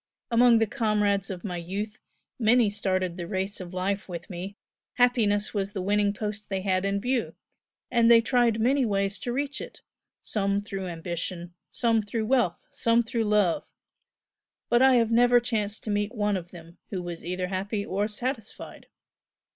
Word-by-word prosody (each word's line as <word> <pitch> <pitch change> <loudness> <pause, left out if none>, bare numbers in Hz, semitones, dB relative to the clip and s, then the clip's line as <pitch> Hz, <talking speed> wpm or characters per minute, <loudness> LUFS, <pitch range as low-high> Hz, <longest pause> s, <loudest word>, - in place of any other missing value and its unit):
Among 235 0 +6
the 225 - +3
comrades 210 -4 0
of 185 -3 -6
my 180 -4 -4
youth 200 +5 -5 0.4
many 225 -1 +4
started 185 -3 -1
the 175 -1 -5
race 190 +1 -3
of 175 -1 -8
life 190 +2 -2
with 175 +3 -7
me 185 +3 -6 0.4
happiness 220 -5 +2
was 200 -1 -2
the 195 - -3
winning 205 +1 +2
post 210 0 -5
they 195 -1 -1
had 185 0 0
in 200 0 0
view 245 +2 -1 0.6
and 235 -1 +4
they 235 -1 +8
tried 235 -1 +2
many 260 +4 +3
ways 200 -2 0
to 240 - -3
reach 285 +3 -2
it - - -10 0.4
some 200 -1 0
through 195 -2 -5
ambition, 170 +1 -5 0.2
some 230 -2 +1
through 220 +1 -3
wealth, 240 -8 +1
some 230 +1 +2
through 225 0 -1
love 210 -5 +1 1.0
but 240 +1 +4
I 265 -1 +6
have 230 -2 +3
never 245 +1 +5
chanced 220 -3 -2
to 215 - -3
meet 205 +3 -1
one 205 -2 +1
of 175 -2 -5
them 170 -1 -13
who 185 -3 -4
was 175 -1 -6
either 180 +1 -3
happy 200 +2 -2
or 200 +3 -1
satisfied. 225 +1 -5
205 Hz, 170 wpm, -27 LUFS, 190-230 Hz, 1.0 s, they